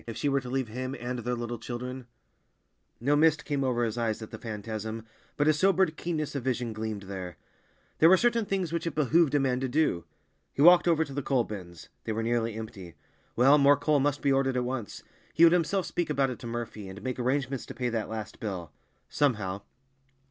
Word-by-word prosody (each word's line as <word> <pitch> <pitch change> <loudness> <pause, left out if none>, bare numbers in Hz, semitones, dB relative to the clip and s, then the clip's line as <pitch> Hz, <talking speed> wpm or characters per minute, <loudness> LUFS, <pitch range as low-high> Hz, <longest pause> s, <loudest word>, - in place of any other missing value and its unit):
If 115 - -6
she 145 - 0
were 140 0 +2
to 125 - -8
leave 130 -1 -1
him 130 +4 -4
and 125 +1 -4
their 120 +1 -2
little 120 -1 -5
children— 125 +1 -6 0.9
No 140 +5 +2
mist 155 0 +3
came 145 -2 -1
over 125 -2 +1
his 115 +1 -2
eyes 115 -2 -1
at 110 - -10
the - - -8
phantasm, 110 0 -5 0.3
but 145 - +2
a 155 - +6
sobered 185 0 +2
keenness 155 -2 -3
of 140 - -2
vision 125 -3 -1
gleamed 110 -2 -4
there. 95 -3 -7 0.6
There 160 - +7
were 185 - +7
certain 235 0 +2
things 190 -5 -2
which 170 0 -2
it 165 - -3
behooved 155 +1 +3
a - - +4
man 130 -2 +1
to 130 0 -2
do. 125 - +1 0.5
He - - -2
walked 175 +1 +7
over 160 -2 +3
to 140 - -10
the 145 - -2
coal 130 -2 +1
bins—they 95 +1 -8
were 110 +1 -2
nearly 115 -1 0
empty. 105 -6 -8 0.4
Well, 135 +5 +6
more 140 0 +6
coal 145 +1 +2
must 145 +1 0
be 140 - +3
ordered 135 -1 +2
at 125 - +1
once; 125 -4 -5 0.3
he 165 - +5
would 170 0 +8
himself 180 +2 +1
speak 175 -2 -2
about 140 -3 +1
it 125 - -7
to 120 - -7
Murphy, 115 -4 -5
and 95 +2 -9
make 130 0 -3
arrangements 130 +1 -1
to - - -8
pay 125 0 -1
that 115 -3 -2
last 110 -1 -6
bill—somehow. 95 - -3
125 Hz, 215 wpm, -28 LUFS, 110-145 Hz, 0.9 s, would